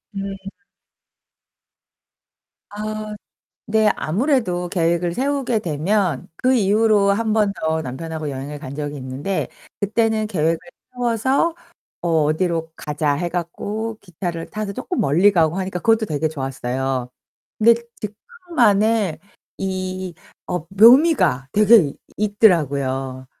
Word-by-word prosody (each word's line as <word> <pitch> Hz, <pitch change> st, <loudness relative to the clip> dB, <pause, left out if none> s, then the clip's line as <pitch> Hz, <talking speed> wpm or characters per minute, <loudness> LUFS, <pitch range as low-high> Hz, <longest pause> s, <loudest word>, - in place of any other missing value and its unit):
음. 195 Hz, 0 st, -5 dB, 2.2 s
아. 215 Hz, 0 st, -5 dB, 0.5 s
네 220 Hz, 0 st, +3 dB
아무래도 185 Hz, -, 0 dB
계획을 170 Hz, -1 st, 0 dB
세우게 270 Hz, -3 st, 0 dB
되면 175 Hz, -2 st, -1 dB
그 255 Hz, +6 st, +2 dB
이후로 210 Hz, -1 st, +3 dB
1 220 Hz, +1 st, +1 dB
번 210 Hz, -2 st, +2 dB
더 160 Hz, 0 st, 0 dB
남편하고 155 Hz, +3 st, -5 dB
여행을 140 Hz, +2 st, -6 dB
간 135 Hz, +2 st, -7 dB
적이 145 Hz, -1 st, -4 dB
있는데 135 Hz, +9 st, -3 dB, 0.3 s
그때는 220 Hz, +1 st, +1 dB
계획을 165 Hz, -4 st, +1 dB, 0.4 s
세워서 250 Hz, +7 st, +1 dB, 0.5 s
어 175 Hz, -, -2 dB, 0.2 s
'어디로 165 Hz, +1 st, 0 dB
가자.' 150 Hz, -1 st, -1 dB
해 175 Hz, +4 st, -2 dB
갖고 205 Hz, +6 st, -4 dB
기차를 175 Hz, -2 st, -5 dB
타서 215 Hz, -1 st, -4 dB
쪼끔 285 Hz, -, -3 dB
멀리 175 Hz, +9 st, +4 dB
가고 165 Hz, -1 st, +2 dB
하니까 185 Hz, -1 st, -3 dB
그것도 225 Hz, +1 st, +3 dB
되게 155 Hz, +1 st, -1 dB
좋았어요. 130 Hz, -3 st, -3 dB, 0.5 s
근데 230 Hz, +2 st, +6 dB, 0.3 s
즉흥만의 220 Hz, -, 0 dB, 0.4 s
이 185 Hz, -1 st, -3 dB, 0.3 s
어 180 Hz, -3 st, -2 dB
묘미가 210 Hz, -, +5 dB
되게 210 Hz, -8 st, +5 dB, 0.2 s
있더라고요. 140 Hz, -, +1 dB
190 Hz, 240 characters per minute, -21 LUFS, 155-215 Hz, 2.2 s, 근데